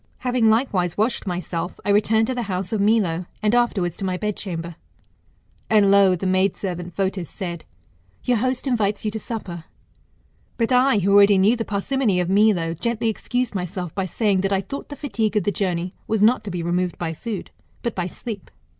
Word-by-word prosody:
Having 250 -3 +2
likewise 205 -7 +1
washed 220 0 0
myself, 175 -1 -3
I 205 - +2
returned 220 +2 +3
to 255 - -2
the 250 - -2
house 185 +2 -3
of 210 - +1
Milo; 195 -5 +2 0.2
and 210 +1 +2
afterwards 210 -8 +1
to - - -6
my 185 -1 -1
bedchamber. 180 -5 -4 0.9
And 205 -2 +5
lo! 200 -2 +6
the 180 - -5
maid 185 +1 +2
servant 175 -3 -5
Fotis 190 -4 -1
said. 170 -3 -6 0.6
Your 245 -1 +2
host 255 +3 -1
invites 215 -6 0
you 215 - 0
to 220 - -4
supper. 180 -8 -6 0.9
But 230 +1 0
I, 255 -1 +4
who 200 0 +2
already 200 0 +7
knew 200 +5 +4
the 225 -1 -3
parsimony 210 -1 0
of 180 +1 0
Milo, 195 -5 +3
gently 230 +6 -1
excused 245 +2 -2
myself 180 -2 -4
by 190 -1 -2
saying, 200 -1 +1
that 195 +1 -1
I 195 -1 +2
thought 275 +9 -7
the 290 - -6
fatigue 225 -7 -1
of 205 - +2
the 205 - +1
journey 180 -2 -2
was 220 -2 +1
not 230 +1 +4
to - - -4
be 175 -2 -3
removed 175 +1 -1
by 165 -2 -3
food, 210 +3 -6 0.3
but 235 - -1
by 180 -1 -2
sleep. 205 +1 -7
200 Hz, 195 wpm, -22 LUFS, 180-225 Hz, 0.9 s, already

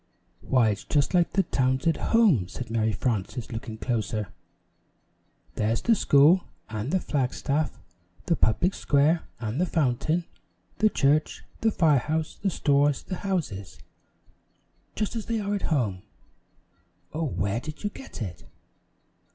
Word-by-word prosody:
"Why, 125 -4 +3
it's 105 - -3
just 145 +2 +1
like 175 -2 +3
the 195 - +3
towns 130 -4 0
at 165 -2 +2
home," 200 - +3
said 120 +4 -7
Mary 110 -1 +1
Frances, 110 +2 -2
looking 115 -1 -6
closer. 110 -4 -2 1.2
"There's 110 +2 0
the 235 - +4
school 160 -2 +5 0.3
and 110 +3 -3
the 190 - +2
flag 135 -7 -1
staff, 150 +2 -1 0.5
the 170 - +2
public 175 - +2
square 150 +4 +2
and 115 +6 -2
the 180 - +2
fountain, 155 +3 0 0.5
the 215 - +5
church, 150 -4 +1 0.2
the 225 - +3
fire 155 -9 +3
house, 155 +3 -3
the 200 - +1
stores 145 -4 +2
and 185 - -2
houses 155 - -3 1.2
just 215 +2 -2
as 225 - -4
they 230 -1 0
are 205 0 -2
at 200 - -1
home! 110 - 0 1.1
Oh, 160 +1 -1
where 100 - -1
did 150 - -8
you 205 - -1
get 270 - -8
it?" 90 -5 -8
145 Hz, 145 wpm, -26 LUFS, 115-175 Hz, 1.2 s, school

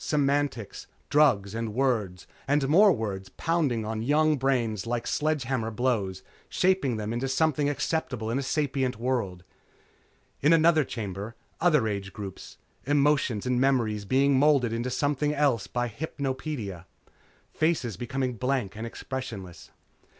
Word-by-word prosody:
Semantics. 140 -6 -1 0.2
Drugs 120 -10 +3
and 115 -1 -4
words 110 -9 0 0.2
and 140 0 +2
more 195 +8 +6
words 100 - -3
pounding 145 -10 0
on 110 0 -3
young 150 +5 +3
brains 120 -7 0
like 120 0 -2
sledgehammer 135 -7 -1
blows, 105 -5 -1 0.3
shaping 185 -10 +2
them 105 +1 -3
into 120 +3 -2
something 145 +1 +1
acceptable 135 -6 -2
in 130 - 0
a - - -1
sapient 135 -3 -1
world. 115 -7 -2 1.0
In 160 +2 +5
other 160 -2 +5
chambers, 105 -3 -5 0.3
other 150 -9 +3
age 100 -2 -4
groups. 100 -3 -8 0.3
Emotion 145 -6 +2
and 125 0 +1
memory 115 -6 +1
being 135 +5 +3
moulded 140 -5 +3
into 120 +2 -2
something 145 +3 0
else 140 -7 +1
by 120 0 -1
hypnopedia. 130 - -4 0.7
Faces 155 - 0
becoming 125 +4 -2
blank 125 -5 -1
and 110 +2 -5
expressionless. 115 -8 -7
130 Hz, 130 wpm, -27 LUFS, 110-145 Hz, 1.0 s, more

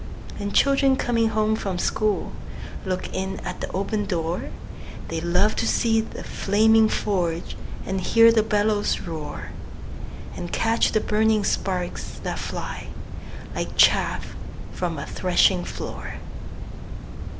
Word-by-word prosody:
And 205 0 -3
children 275 +2 +4
coming 230 -3 +1
home 215 0 +2
from 195 -4 -3
school 210 +3 0 0.6
Look 185 -1 -3
in 190 +1 -3
at 180 - -6
the - - -4
open 205 +2 -1
door; 170 -3 -2 0.6
They 165 -1 -2
love 180 +5 +2
to 225 - +1
see 225 -1 +3
the 220 - -8
flaming 220 +2 +4
forge, 175 -6 -1 0.3
And 190 0 -2
hear 230 +4 +6
the 225 -1 +4
bellows 210 -1 +1
roar, 160 -4 -6 0.8
And 175 - -6
catch 230 0 +2
the 215 - +3
burning 215 0 +2
sparks 180 -3 -2
that - - -3
fly, - - -5 0.7
Like - - -4
chaff - - +3 0.4
from - - -3
a - - -4
threshing - - +2
floor. - - -6
205 Hz, 130 wpm, -24 LUFS, 185-220 Hz, 0.8 s, hear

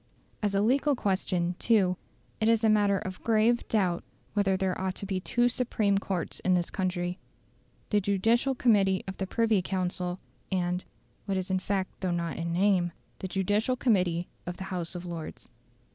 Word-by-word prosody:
As 205 -2 0
a 195 - +3
legal 270 +6 +3
question, 185 -5 0
too, 195 -6 +3 0.4
it 220 +1 +3
is 230 0 +3
a 220 - +5
matter 205 -2 +4
of 185 -2 -6
grave 230 +1 +3
doubt 185 -6 +1 0.3
whether 195 -2 +2
there 190 -1 0
ought 190 0 -1
to - - -5
be 190 -1 -1
two 240 +6 +2
supreme 220 -5 +1
courts 190 -4 -3
in 185 0 +2
this 175 -1 -1
country 180 -1 -2 0.7
the 210 -1 +3
Judicial 225 +7 +2
Committee 200 -6 +3
of 190 - -5
the 190 - -2
Privy 225 -2 +2
Council, 180 -1 -2 0.3
and 180 -1 0 0.4
(what 195 -2 -1
is 185 0 -3
in 185 - +2
fact 190 0 -3
though 185 - 0
not 170 -1 -2
in 170 0 -2
name) 180 -1 +2 0.3
the 190 - -4
Judicial 205 +6 +1
Committee 180 -9 +1 0.2
of 175 - -4
the - - -5
House 175 0 -3
of 175 0 -6
Lords. 170 -2 -7
190 Hz, 175 wpm, -29 LUFS, 180-215 Hz, 0.7 s, a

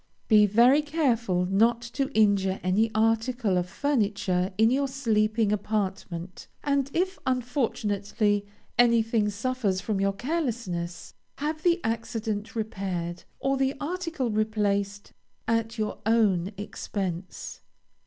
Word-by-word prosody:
Be 210 -2 +6
very 240 +8 +5
careful 240 - +1
not 225 +5 +3
to 270 +3 -2
injure 200 -3 +3
any 200 +5 +2
article 225 -1 +1
of 180 0 0
furniture 200 -7 0
in 225 +2 +5
your 275 +2 +2
sleeping 220 -5 +1
apartment, 195 -4 -3 0.2
and 280 -1 +1
if, 375 +3 0
unfortunately, 215 -5 0 0.4
anything 230 -3 +4
suffers 220 -2 -1
from 205 0 -2
your 195 0 +2
carelessness, 225 - -3 0.2
have 305 +2 -3
the 345 +1 +3
accident 225 -1 -3
repaired, 190 -6 -3
or 270 0 +1
the 270 +1 +1
article 325 -5 -2
replaced, 205 -2 -1 0.3
at 230 0 0
your 215 -1 -2
own 200 -5 +3
expense. 190 -3 -5
220 Hz, 115 wpm, -27 LUFS, 200-250 Hz, 0.4 s, Be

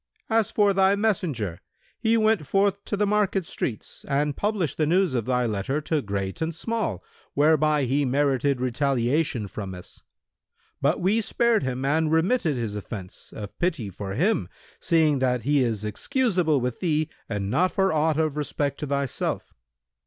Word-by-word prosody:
As 225 -1 +3
for 205 -2 +3
thy 190 +1 +4
messenger, 155 - -1 0.4
he 225 +1 +3
went 215 -8 +2
forth 200 +2 +1
to 205 - -2
the 205 - +2
market 200 -3 +1
streets 115 -7 -5
and 145 0 0
published 205 -6 -1
the 155 - +1
news 180 -1 +2
of 120 -4 -1
thy 125 -1 +1
letter 110 +6 -1
to 155 0 0
great 100 -1 -4
and 160 0 -1
small, 220 - -2 0.3
whereby 150 0 +3
he 135 +3 +1
merited 140 0 +1
retaliation 130 0 0
from 95 -1 -6
us; 90 - -10 0.8
but - - +2
we 205 +6 +2
spared 230 +1 +2
him 130 0 -2
and 155 +2 +2
remitted 165 - +2
his 115 -4 -3
offence, 105 -2 -7
of 105 -2 -7
pity 155 - -1
for 95 +1 -6
him, 195 - +1 0.3
seeing 160 -5 +3
that 125 -2 +1
he 145 0 +3
is 110 -3 -2
excusable 175 - +1
with 125 -1 -3
thee 155 -3 +1 0.2
and 100 -2 -2
not 180 +8 +2
for 195 -3 +1
aught 155 0 +2
of 155 -2 0
respect 145 -1 -2
to 150 - -3
thyself. 140 -1 -2
150 Hz, 165 wpm, -25 LUFS, 125-185 Hz, 0.8 s, thy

